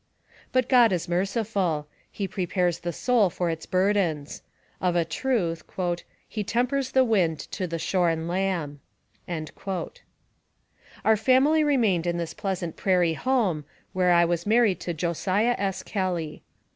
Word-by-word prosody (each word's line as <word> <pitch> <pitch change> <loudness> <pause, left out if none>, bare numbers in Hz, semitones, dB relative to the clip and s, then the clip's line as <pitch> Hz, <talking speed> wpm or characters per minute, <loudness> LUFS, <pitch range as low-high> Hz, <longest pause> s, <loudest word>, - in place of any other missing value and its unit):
But 255 -1 +2
God 245 -4 +6
is 180 -1 -1
merciful. 185 -3 0 0.3
He 200 - -3
prepares 180 -2 -1
the 175 - -3
soul 225 +2 +2
for 175 0 -1
its 160 0 -6
burdens. 185 -6 0 0.4
Of 180 -1 +1
a 170 -1 +2
truth, 170 -3 -1
a 175 -2 0 0.3
He 215 - -3
tempers 250 +5 0
the 260 - +5
wind 180 -9 +2
to 185 -2 -3
the 165 0 -3
shorn 165 -2 0
lamb." 175 -5 -1 0.5
Our 180 +5 -5
family 265 +7 +4
remained 220 - +2
in 175 0 0
this 170 -1 -4
pleasant 185 -4 -4
prairie 180 -4 +2
home, 205 - 0 0.3
where 185 -1 +2
I 170 0 +5
was 170 +2 -1
married 220 -3 +3
to 175 - -4
Josiah 185 +8 +1
S. 195 -2 -2
Kelly. 180 -6 -3
185 Hz, 140 wpm, -26 LUFS, 170-215 Hz, 0.5 s, God